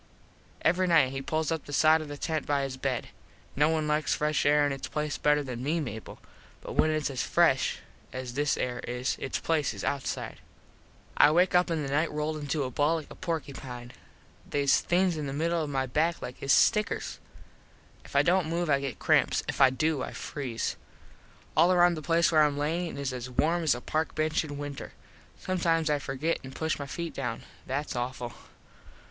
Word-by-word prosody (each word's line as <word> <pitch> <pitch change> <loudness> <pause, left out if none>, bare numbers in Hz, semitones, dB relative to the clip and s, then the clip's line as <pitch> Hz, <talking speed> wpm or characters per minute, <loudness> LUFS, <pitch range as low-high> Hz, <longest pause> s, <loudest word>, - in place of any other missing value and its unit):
Every 180 +3 +3
nite 160 -7 +4
he 135 0 -4
pulls 155 +3 -1
up 160 -2 -2
the - - -9
side 155 +2 +5
of 155 - -7
the 145 0 -7
tent 160 0 -2
by 145 -1 +1
his 135 -1 -3
bed. 130 -2 -2 0.5
No 150 +2 +4
one 155 -1 0
likes 150 0 +1
fresh 150 -1 +1
air 145 0 +5
in 145 - 0
its 135 -1 -4
place 150 -1 -3
better 150 0 +3
than 125 -3 -6
me, 155 +6 0
Mable, 110 -7 -6 0.4
but - - -8
when 155 - +3
its 155 -2 0
as 130 - -2
fresh - - +2 0.3
as 130 -1 -6
this 145 +2 +1
air 125 -1 -2
is 125 +2 -1
its 135 - -2
place 160 -3 0
is - - -7
outside. 140 -2 -3 0.8
I - - +7
wake 175 +4 +3
up 180 0 +4
in 160 -3 -1
the - - -4
nite 155 +3 +1
rolled 150 +1 -2
into 145 0 -2
a 130 - -4
ball 145 +6 +2
like 160 -3 -6
a - - -9
porkypine. 135 -8 -5 0.6
Theys 140 -1 +3
things 180 -1 +1
in 150 -2 -3
the 135 - -4
middle 170 +1 +1
of 150 - -3
my 135 -2 0
back 160 +6 0
like 125 - -7
his 135 - 0
stickers. 210 +8 +2 0.8
If - - -14
I - - +5
dont 180 -1 +2
move 170 -1 -1
I 140 - +4
get 140 -2 -4
cramps. - - +2
If - - -2
I 135 - +8
do, 145 +2 0
I - - -5
freeze. 130 -6 -4 0.8
All 165 +4 +5
around 175 -1 +5
the 155 - -5
place 170 +3 +2
where 155 -1 +6
Im 145 -1 +1
lyin 160 +2 -2
is 140 -2 -3
as 125 0 -5
warm 165 +7 +1
as 155 -6 +3
a 120 - -7
park 155 +4 -2
bench 155 +1 +1
in 145 -2 -7
winter. 145 -1 -6 0.4
Sometimes 165 -4 0
I 145 - +1
forget 140 +5 -2
and 130 0 -9
push 160 -1 -1
my 140 - -5
feet 170 +4 -5
down. 120 -4 -4 0.2
That's 140 +2 -3
awful. 120 -1 -4
150 Hz, 205 wpm, -28 LUFS, 135-160 Hz, 0.8 s, I